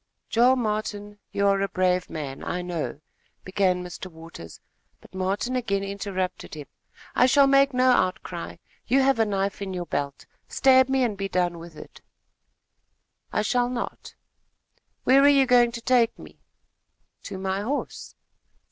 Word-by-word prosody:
"Joel 245 +3 +5
Martin, 210 -3 -3
you 200 - 0
are 195 -1 +3
a 195 - +1
brave 185 -1 0
man, 140 -4 -6
I 180 - -3
know, 170 -4 -4 0.2
" - - -42
began 185 -2 +1
Mr. 180 +1 -8
Waters; 160 - -12 0.4
but - - -19
Martin 195 +7 -2
again 200 -6 -1
interrupted 195 -4 -4
him 150 - -7 0.3
with: - - -25
"I 250 - +4
shall 275 +2 +5
make 275 0 +4
no 255 0 +3
outcry. 185 -5 -1 0.3
You 270 +3 +3
have 270 -3 +2
a 225 - +4
knife 200 -1 -2
in 190 -2 -4
your 175 -1 -4
belt. 140 -3 -4 0.2
Stab 260 -1 +4
me, 265 -1 +2
and 225 -4 0
be 195 0 -4
done 175 -2 0
with 165 -1 -11
it." - - -13 1.3
"I 210 - 0
shall 245 +3 +1
not." 245 -1 -6 0.9
"Where 270 +2 +5
are 285 - +6
you 275 -2 +5
going 245 -2 +4
to 235 - -6
take 240 -1 +2
me?" - - -14 0.9
"To 195 - -6
my 190 +1 -2
horse." 265 +8 -4
200 Hz, 165 wpm, -25 LUFS, 185-245 Hz, 1.3 s, are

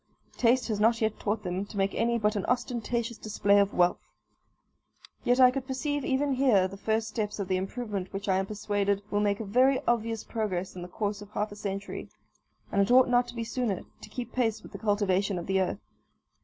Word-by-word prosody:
Taste 250 +1 +3
has 210 -2 -1
not 225 +2 +4
yet 220 -1 0
taught 210 +1 -1
them 180 +1 -2
to 205 - -10
make 195 0 +1
any 235 +1 +1
but 210 -1 +1
an 200 - -1
ostentatious 240 -2 -1
display 205 -1 +3
of 200 0 +3
wealth. 175 0 +2 1.2
Yet 245 +1 +3
I 255 -1 +8
could 260 0 -4
perceive 290 +2 -2
even 275 +2 +1
here 250 -8 +4
the 190 - -9
first 220 +2 -1
steps 215 -1 -3
of 200 -3 -3
the 185 - +1
improvement 195 -1 -4
which 200 +1 -5
I 190 -1 +3
am 190 - -2
persuaded 205 -1 -1
will 205 - +2
make 205 -1 +1
a 225 - -4
very 255 +6 +4
obvious 230 -2 0
progress 190 -6 -3
in 180 - -7
the 175 - -6
course 205 +2 -3
of 205 - -10
half 210 0 -2
a - - -8
century, 200 -1 -5 0.6
and 200 - +3
it 200 - +1
ought 255 +1 +6
not 245 0 +3
to - - -9
be 230 - -2
sooner, 230 -4 -2 0.2
to - - -10
keep 245 +1 -6
pace 225 -4 0
with - - -12
the - - -8
cultivation 205 -2 +1
of 170 - -4
the 190 0 +1
earth. 190 +1 -1
215 Hz, 220 wpm, -28 LUFS, 200-240 Hz, 1.2 s, I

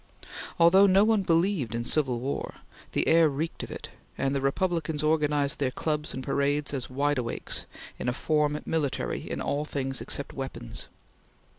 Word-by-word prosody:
Although 190 +4 +7
no 195 +1 +5
one 220 -1 +3
believed 165 - +1
in 120 - -1
civil 130 -2 +1
war, 135 +3 -3 0.4
the - - +1
air 165 -1 +6
reeked 150 +4 -3
of - - -6
it, - - -7 0.3
and 135 0 0
the 140 - 0
Republicans 160 +1 0
organized 150 -2 +1
their 135 -3 +1
clubs 150 +3 -2
and 130 - -5
parades 140 +2 0
as 130 -3 -3
Wide 140 +1 +1
Awakes 115 -2 -3 0.3
in 125 - -1
a - - 0
form 150 +1 +1
military 155 -4 -2
in - - -3
all 145 +1 -1
things 135 -3 -3
except 140 - -3
weapons. 135 - -5
145 Hz, 165 wpm, -28 LUFS, 135-160 Hz, 0.4 s, Although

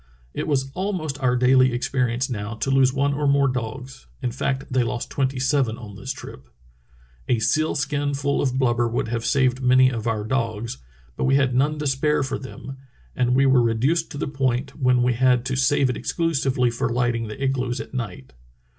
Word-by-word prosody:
It - - -3
was 135 -3 0
almost 175 -6 -3
our 125 -1 +2
daily 130 0 +4
experience 125 0 0
now 110 -2 -4
to 135 +5 -2
lose 135 -1 +4
one 140 +1 0
or 145 0 -1
more 140 0 +4
dogs 125 +1 -5 0.2
[in 125 - 0
fact, 130 +2 -2
they 130 - +3
lost 120 0 -3
tvventy 135 -1 0
sevep 130 -4 +1
on 105 -4 -10
this 130 +6 -5
trip]. 65 - -10 0.8
A 120 - +2
seal 155 +8 +1
skin 145 0 -1
full 140 0 0
of 130 -2 0
blubber 120 -2 +2
would 115 -1 -2
have 115 0 -2
saved 130 -1 +1
many 130 0 +5
of 115 -2 -4
our 110 -2 -1
dogs; 115 - -2 0.4
but - - -1
we 135 0 +3
had 135 -2 +2
none 145 +4 +1
to 150 - -4
spare 145 +2 +1
for 135 0 -3
them, 135 0 -9 0.4
as 125 - +1
we 130 +2 +3
were 130 -2 +5
reduced 130 +9 +1
to 145 - -8
the 150 - -2
point 135 -1 -1
when 125 -3 +2
we 125 0 +2
had 125 0 +2
to 130 0 -1
save 135 +1 +2
it 125 - -2
exclusively 135 -7 0
for 115 - -2
lighting 120 -1 0
the 105 - -8
igloos 130 -2 -1
at - - -8
night. 90 - -6
130 Hz, 200 wpm, -23 LUFS, 120-135 Hz, 0.8 s, many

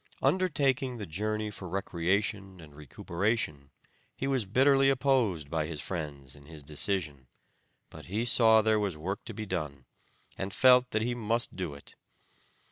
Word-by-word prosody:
Undertaking 140 -8 +1
the 105 - -5
journey 105 +5 -2
for 95 -3 -8
recreation 95 +2 -1
and 75 -3 -14
recuperation 75 - -3 0.5
he - - -4
was 135 -5 0
bitterly 135 +6 +4
opposed 125 - +1
by 80 -2 -1
his 80 -2 -6
friends 75 -6 -5
in 70 0 -16
his 80 -3 -11
decision, 75 -2 -3 0.6
but - - -11
he 105 +6 -1
saw 110 -2 +6
there 110 0 +3
was 100 -6 -2
work 95 +6 -4
to 115 - -7
be 110 0 -5
done, 70 -8 -4 0.5
and 95 0 -4
felt 125 -1 +6
that 110 0 0
he 120 +1 -1
must 115 0 -1
do 85 -6 -4
it. 70 - -14
100 Hz, 155 wpm, -29 LUFS, 80-115 Hz, 0.6 s, saw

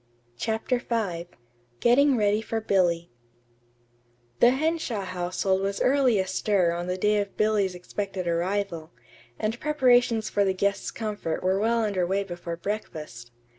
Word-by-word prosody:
CHAPTER 225 - -1
V 195 -9 -2 0.5
GETTING 260 +3 +4
READY 210 0 +2
FOR 225 0 -3
BILLY 175 - +1 1.3
The 240 - +7
Henshaw 280 -5 -1
household 185 +1 -1
was 200 0 -2
early 260 -4 +3
astir 190 -1 +1
on 175 +1 -3
the 180 0 -2
day 210 +2 +2
of 200 -1 -4
Billy's 210 -4 +1
expected 185 0 -5
arrival, 170 -1 -1 0.5
and 225 +2 -2
preparations 245 -6 +3
for 205 - +1
the 190 -1 +1
guest's 200 +1 0
comfort 210 -8 -4
were 190 +1 +2
well 230 +2 +2
under 190 -4 0
way 195 +2 0
before 175 -2 -6
breakfast. 155 - -6
200 Hz, 135 wpm, -26 LUFS, 180-225 Hz, 1.3 s, The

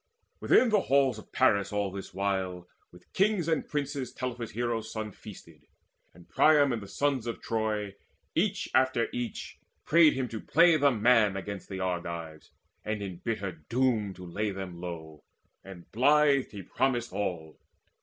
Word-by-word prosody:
Within 255 - +4
the 210 -2 +3
halls 135 -3 +2
of - - -15
Paris 100 -6 +2
all 100 -2 -1
this 95 0 -8
while 95 -2 -2 0.2
With 90 0 -19
kings 195 -3 +2
and 160 -1 0
princes 140 -3 -3
Telephus' 125 -3 -5
hero 120 0 -2
son 110 -1 -6
Feasted; - - -14 0.4
and 85 0 -18
Priam 145 -4 +4
and 115 - -3
the 100 - -9
sons 135 0 -1
of 115 - -4
Troy 110 -3 -2 0.4
Each - - 0
after 130 -3 +2
each 120 -1 -5 0.3
prayed 165 -1 +6
him 130 -1 -2
to 110 - -6
play 170 +2 +5
the 145 -2 +4
man 110 -4 +3
Against 100 0 -7
the 95 -1 -5
Argives, 85 -3 -4 0.3
and 105 -1 -3
in 95 -3 -6
bitter 105 -2 -3
doom 105 - -1
To 90 - -10
lay 105 +5 -2
them 95 -3 -7
low; 80 -4 -8 0.4
and 95 -3 -12
blithe 140 +2 +3
he 100 -2 -9
promised 120 +1 -1
all. 85 -6 -4
110 Hz, 160 wpm, -29 LUFS, 95-130 Hz, 0.4 s, prayed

